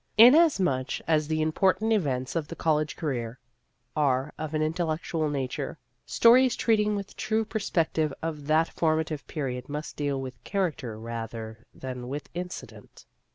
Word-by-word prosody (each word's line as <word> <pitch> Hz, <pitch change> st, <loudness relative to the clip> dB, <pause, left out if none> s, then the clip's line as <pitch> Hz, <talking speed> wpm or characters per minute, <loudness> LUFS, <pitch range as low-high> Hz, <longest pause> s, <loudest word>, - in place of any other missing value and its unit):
Inasmuch 220 Hz, -, +5 dB
as 155 Hz, -2 st, +2 dB
the 155 Hz, 0 st, 0 dB
important 190 Hz, +7 st, +2 dB
events 135 Hz, -10 st, -1 dB
of 160 Hz, -3 st, -1 dB
the 165 Hz, -, -7 dB
college 155 Hz, -2 st, 0 dB
career 125 Hz, -6 st, -3 dB, 0.6 s
are 140 Hz, -1 st, +1 dB
of 155 Hz, 0 st, -4 dB
an 155 Hz, -, +1 dB
intellectual 160 Hz, -1 st, -1 dB
nature, 135 Hz, -3 st, -3 dB, 0.3 s
stories 250 Hz, +2 st, +5 dB
treating 210 Hz, -2 st, +2 dB
with 200 Hz, -1 st, -6 dB
true 220 Hz, 0 st, 0 dB
perspec 200 Hz, -7 st, -1 dB
tive 155 Hz, -2 st, +1 dB
of 150 Hz, -3 st, -5 dB
that 160 Hz, +2 st, +3 dB
formative 155 Hz, -2 st, -1 dB
period 130 Hz, -4 st, -4 dB
must 150 Hz, +1 st, -5 dB
deal 145 Hz, -2 st, -1 dB
with 130 Hz, -1 st, -7 dB
character 155 Hz, -, -2 dB
rather 115 Hz, 0 st, -6 dB
than 125 Hz, -2 st, -7 dB
with 145 Hz, +3 st, -5 dB
incident. 180 Hz, +1 st, -8 dB
155 Hz, 145 wpm, -27 LUFS, 135-180 Hz, 0.6 s, Inasmuch